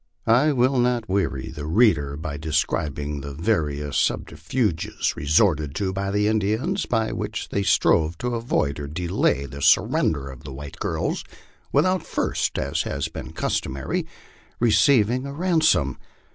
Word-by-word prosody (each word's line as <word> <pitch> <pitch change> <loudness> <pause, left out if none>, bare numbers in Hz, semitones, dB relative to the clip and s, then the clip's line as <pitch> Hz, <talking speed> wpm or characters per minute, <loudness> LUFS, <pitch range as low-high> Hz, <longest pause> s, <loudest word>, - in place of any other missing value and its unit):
I 125 +7 +4
will 130 0 +2
not 120 -2 +1
weary 95 -9 -1
the 75 -2 -6
reader 80 -7 +3
by 75 -1 -5
describing 75 -1 -2
the 70 0 -7
various 75 - -1
subterfuges 80 - -1
re 70 - -6
sorted 75 -4 +3
to 95 0 -1
by 100 +1 -2
the 105 +1 +1
Indians, 110 - 0
by 110 -2 0
which - - -4
they 100 - -1
strove 80 -4 +3
to 125 +5 -2
avoid 115 - -1
or 70 - -5
delay 80 -3 0
the 70 +1 -8
sur - - +6
render 70 -3 -1
of 65 - -13
the 65 - -8
white 70 +1 -9
girls - - -2 0.5
without 185 +6 +2
first, - - -1
as - - -1
had - - -3
been - - -7
customary, 65 0 -2 0.5
receiving 120 +1 +3
a 140 - -6
ransom. 160 - +2
95 Hz, 150 wpm, -24 LUFS, 75-120 Hz, 0.5 s, sur